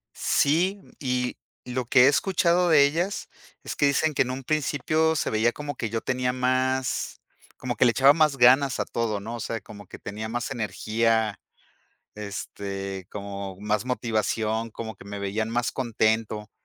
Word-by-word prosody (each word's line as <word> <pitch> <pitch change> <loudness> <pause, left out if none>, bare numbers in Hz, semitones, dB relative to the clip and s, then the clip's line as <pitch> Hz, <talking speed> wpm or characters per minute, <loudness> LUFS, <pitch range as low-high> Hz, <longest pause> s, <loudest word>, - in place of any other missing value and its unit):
Sí, 180 +8 +2 0.2
y 125 -2 -1 0.3
lo 125 0 -3
que 125 +1 +6
he - - +7
escuchado 175 +4 +3
de 145 -3 +7
ellas 170 +7 -2 0.3
es - - -5
que 145 - +3
dicen 155 +2 +2
que - - +1
en 125 - +1
un 130 +1 -5
principio 155 +2 +1
se - - -1
veía 110 +2 +2
como 145 +1 -6
que 110 - -3
yo 115 +1 -2
tenía 125 0 0
más 130 0 0 0.4
como 125 -1 -3
que - - +4
le 120 - +5
echaba 135 +3 +6
más 150 -3 +2
ganas 130 +2 +5
a - - 0
todo, 110 -4 -2
¿no? 115 +3 -6
O - - -9
sea, 115 0 -4
como 100 -3 -12
que - - -10
tenía 110 +2 -6
más 120 +1 -3
energía, 110 0 0 0.8
este, 100 -2 -6
como 100 -2 -6
más 105 +2 0
motivación, 115 -2 -1
como 110 -2 -7
que - - -14
me 100 0 -6
veían 105 +3 -2
más 120 0 0
contento. 110 -3 -1
120 Hz, 175 wpm, -25 LUFS, 110-135 Hz, 0.8 s, he